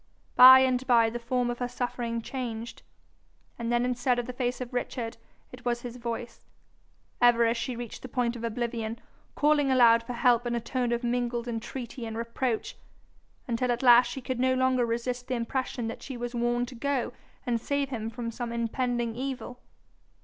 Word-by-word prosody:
By 260 +1 +10
and 260 -1 +1
by 230 -3 +4
the 240 - -4
form 245 +1 0
of 240 - -6
her 245 - -1
suffering 240 -2 -3
changed, 235 -3 -5 0.8
and 235 0 -2
then 240 0 +2
instead 250 0 +1
of 245 - -1
the 250 - -6
face 245 0 -2
of 250 -1 -6
Richard 245 -2 -3 0.3
it 250 -1 -12
was 240 -1 -1
his 245 0 -7
voice, 235 0 -6 0.8
ever 240 -1 +5
as 230 +1 +2
she 245 +1 -3
reached 235 -1 -7
the - - -7
point 245 -1 -1
of 235 - -7
oblivion, 230 -1 -3 0.4
calling 295 -2 +3
aloud 235 -3 +6
for 240 +2 -6
help 240 -1 +3
in 240 - -1
a - - 0
tone 245 +1 -2
of 235 +1 -1
mingled 240 0 -1
entreaty 235 +1 -5
and 225 0 -5
reproach, 230 0 -2 0.7
until 245 +1 0
at 240 +2 -2
last 245 0 +7
she 265 +2 -6
could 255 0 -4
no 260 0 +3
longer 255 -2 +2
resist 245 +2 -3
the 260 - -1
impression 240 0 -2
that 225 - -6
she 265 -3 -7
was 240 +1 -5
warned 240 0 0
to - - -10
go 265 +1 -2 0.3
and 235 -2 0
save 280 +1 -1
him 225 -4 -4
from 230 0 -5
some 240 0 -5
impending 235 0 -1
evil. 255 -1 -5
240 Hz, 190 wpm, -28 LUFS, 235-250 Hz, 0.8 s, By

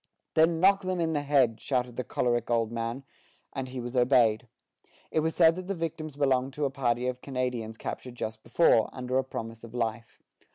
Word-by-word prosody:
"Then 160 +1 +4
knock 195 +2 +5
them 185 -1 -2
in 165 -1 0
the 145 - 0
head," 135 -6 +2
shouted 125 -3 -1
the 125 - -2
choleric 120 -1 0
old 115 -2 +1
man; 115 +3 -3 0.5
and 135 -1 -4
he 130 0 -6
was 120 +1 -6
obeyed. 120 -2 +3 0.6
It - - +2
was 160 +1 -1
said 165 -1 +6
that 185 0 -6
the 195 - -2
victims 160 -3 -4
belonged 135 -2 +1
to 150 0 -1
a 135 - -1
party 125 -2 0
of 125 0 -2
Canadians 125 -4 -3
captured 125 +1 -6
just 110 -2 -5
before, 115 -2 +3
under 130 0 -1
a - - +1
promise 115 -3 -7
of 115 +1 -10
life. 115 -1 -3
125 Hz, 200 wpm, -28 LUFS, 120-150 Hz, 0.6 s, said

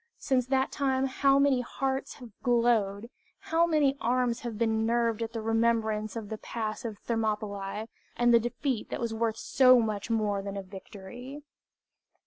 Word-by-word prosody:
Since 255 -2 0
that 265 0 +1
time 270 -2 0
how 275 +1 +3
many 280 -2 +3
hearts 270 +2 -3
have 245 -3 -12
glowed, 235 -4 +2 0.3
how 330 +1 +1
many 295 -4 +2
arms 245 0 +1
have 230 -3 -6
been 220 -1 +1
nerved 230 -1 +1
at 225 0 -3
the 230 - -4
remembrance 225 -1 +1
of 220 -3 -5
the 220 -1 -5
Pass 220 +1 -4
of 220 -3 -5
Thermopylć, 210 -2 -3 0.3
and 240 0 +3
the 235 - +7
defeat 240 +1 -3
that - - -4
was 235 -1 -2
worth 225 0 -1
so 255 0 +5
much 215 -2 -2
more 210 -3 0
than 200 0 -5
a 195 - -4
victory! 210 +8 -10
230 Hz, 165 wpm, -29 LUFS, 215-255 Hz, 0.3 s, the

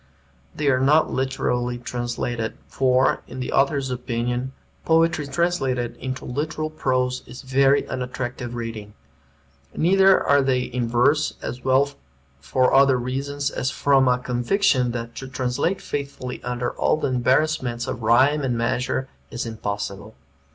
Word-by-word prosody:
They 150 - -1
are 130 -2 +3
not 150 +4 +3
literally 125 -2 -1
translated, 120 -1 -3
for, 130 0 +2
in 130 - -8
the 125 - -3
author's 135 -1 +1
opinion, 125 +1 -2 0.3
poetry 160 -2 +2
translated 135 -6 -1
into 130 0 -5
literal 155 +4 -3
prose 130 -4 0
is 125 - -10
very 135 +1 +3
unattractive 125 -1 -4
reading. 115 -3 -6 0.8
Neither 190 +3 +5
are 140 0 +3
they 130 -2 +1
in 125 -1 -2
verse, 130 +6 +2
as 125 +2 -5
well 135 +2 +3 0.5
for 130 - +1
other 135 -1 +5
reasons 140 +3 -3
as 130 - -1
from 135 -1 +3
a 125 0 +4
conviction 125 +3 +1
that 115 -1 -5
to 135 - -6
translate 130 +8 -1
faithfully 140 -3 -5
under 125 0 -2
all - - +1
the 155 - -1
embarrassments 125 -1 +1
of 115 - -5
rhyme 130 +7 +4
and 125 -4 -1
measure 125 +3 -1 0.2
is 120 - -4
impossible. 105 -1 -5
130 Hz, 135 wpm, -23 LUFS, 120-140 Hz, 0.8 s, Neither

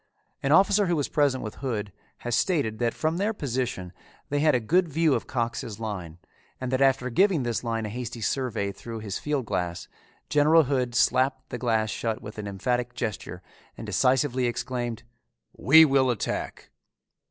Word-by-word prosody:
An 135 - 0
officer 195 +4 +5
who 175 - +1
was 145 -3 0
present 140 -3 +1
with 110 - -7
Hood 110 -7 -3 0.3
has 120 -1 0
stated 115 - 0
that 120 -1 0
from 160 +2 -1
their 205 +4 0
position 120 - -3 0.4
they 145 - 0
had 155 -2 +4
a - - +3
good 175 +10 +2
view 160 0 +2
of - - -2
Cox's 115 -3 -3
line 95 -7 -5 0.4
and 130 -1 -4
that 130 0 0
after 130 -2 +2
giving 185 - +3
this 120 -1 -2
line 115 -2 -2
a - - -4
hasty 120 +1 -6
survey 115 -4 -1
through 115 +2 -8
his 100 -3 -4
field 145 -4 -2
glass, 90 -3 -3 0.4
General 155 +3 +5
Hood 125 -3 -1
slapped 130 +2 +2
the 125 - -4
glass 110 -3 +1
shut 110 -2 -2
with 105 +1 -9
an 105 - -5
emphatic 120 +5 -2
gesture 105 -6 -5 0.3
and - - -7
decisively 130 -1 +2
exclaimed, 120 -1 -3 0.5
"We 160 +4 +7
will 135 -3 +3
attack!" 120 -4 -3
125 Hz, 175 wpm, -26 LUFS, 110-145 Hz, 0.5 s, We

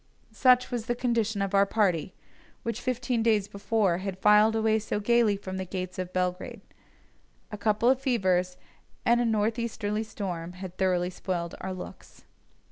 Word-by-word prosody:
Such 250 -1 +4
was 240 -2 -3
the 240 - 0
condition 225 -4 0
of 195 - -3
our 200 0 +4
party, 185 -6 0 0.5
which 230 +1 -3
fifteen 250 -1 -1
days 215 -3 +2
before 200 -3 0
had 190 -1 -4
filed 210 +2 +5
away 220 0 +2
so 210 -1 -3
gaily 225 -1 +3
from 190 -1 -6
the 190 - -2
gates 185 0 -5
of 185 -1 -4
Belgrade. 180 0 -2 0.9
A 210 - -5
couple 215 +2 +1
of 260 +1 +4
fevers 185 -8 +1 0.5
and 240 +1 +4
a - - +1
north 220 +1 +1
easterly 215 -2 -2
storm 180 -6 -5
had 185 -1 -8
thoroughly 180 -1 +1
spoiled 175 -2 -4
our 190 - -4
looks. 185 -1 -10
205 Hz, 165 wpm, -27 LUFS, 185-230 Hz, 0.9 s, filed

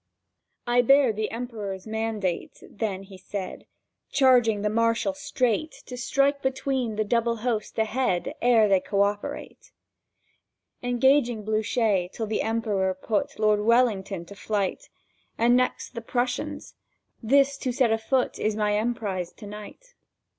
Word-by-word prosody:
"I 240 0 +4
bear 270 -1 +5
the 215 +1 -2
Emperor's 220 -5 -5
mandate," 220 -4 -3
then 200 -3 -4
he 190 -1 -13
said, 190 0 -6 0.4
"Charging 240 -6 +4
the 210 - +2
Marshal 230 +5 +1
straight 280 0 -1
To 250 - -7
strike 275 +3 +1
between 265 -3 -1
the 215 - +1
double 230 +2 +1
host 220 -4 -2
ahead 220 -5 0
Ere 230 -3 +5
they 195 -2 +4
co 200 +2 +1
operate, 205 0 -4 1.1
"Engaging 245 -2 +2
Blücher 215 -3 +1
till 225 - -4
the 215 0 -1
Emperor 210 -4 0
put 205 +3 -2
Lord 215 -1 +3
Wellington 210 -6 +2
to 200 - -11
flight, 200 -2 -2 0.5
And 240 +2 +4
next 255 0 0
the 230 - -5
Prussians. 245 +2 -3 0.5
This 275 +4 +3
to 260 -2 -2
set 250 -2 +2
afoot 225 +3 0
Is 215 0 0
my 210 -1 +1
emprise 210 -6 -2
to 210 - -12
night." 210 - -10
225 Hz, 135 wpm, -26 LUFS, 205-245 Hz, 1.1 s, bear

